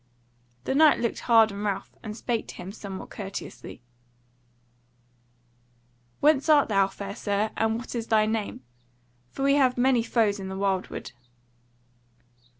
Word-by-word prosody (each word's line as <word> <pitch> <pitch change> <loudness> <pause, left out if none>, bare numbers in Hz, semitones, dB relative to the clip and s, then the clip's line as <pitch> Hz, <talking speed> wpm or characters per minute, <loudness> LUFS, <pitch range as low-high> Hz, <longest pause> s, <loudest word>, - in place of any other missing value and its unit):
The - - -1
Knight 305 +2 +5
looked 235 -1 -1
hard 225 -2 +5
on 200 +1 -6
Ralph, 200 -2 -3
and 215 0 -7
spake 235 -2 -2
to - - -9
him 185 - -8
somewhat 200 -2 -8
courteously: 195 - -8 2.4
"Whence 295 0 +3
art 295 -5 +5
thou, 195 -2 +3
fair 200 +1 -7
Sir, 210 0 -1
and 225 0 +1
what 240 - -7
is 230 -2 -4
thy 215 -1 +3
name? 215 -10 -3 0.7
for 270 - -5
we 275 0 +4
have 255 -3 +3
many 250 -1 +3
foes 220 -3 +1
in 190 - -6
the 190 - -5
wildwood." 195 -8 -2
220 Hz, 145 wpm, -26 LUFS, 200-245 Hz, 2.4 s, Knight